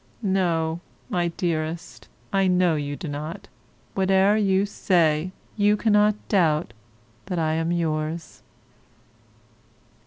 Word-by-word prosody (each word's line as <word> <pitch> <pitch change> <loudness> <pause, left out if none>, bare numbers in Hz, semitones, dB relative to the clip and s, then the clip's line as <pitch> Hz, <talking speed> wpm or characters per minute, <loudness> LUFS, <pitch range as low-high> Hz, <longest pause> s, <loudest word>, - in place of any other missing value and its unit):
No, 170 -4 0 0.3
my 175 -1 +1
dearest, 165 -1 -3 0.3
I 195 -1 +3
know 180 -2 +3
you 145 -1 -2
do 165 - -7
not, 155 +7 -6 0.5
whate'er 195 +1 +3
you 195 -2 +2
say, 170 -4 +1 0.2
you 210 0 +3
cannot 210 -1 +3
doubt 160 - +2 0.5
that 180 -2 -3
I 160 -1 +1
am 165 +1 0
yours. 160 -1 -2
175 Hz, 105 wpm, -24 LUFS, 160-195 Hz, 0.5 s, I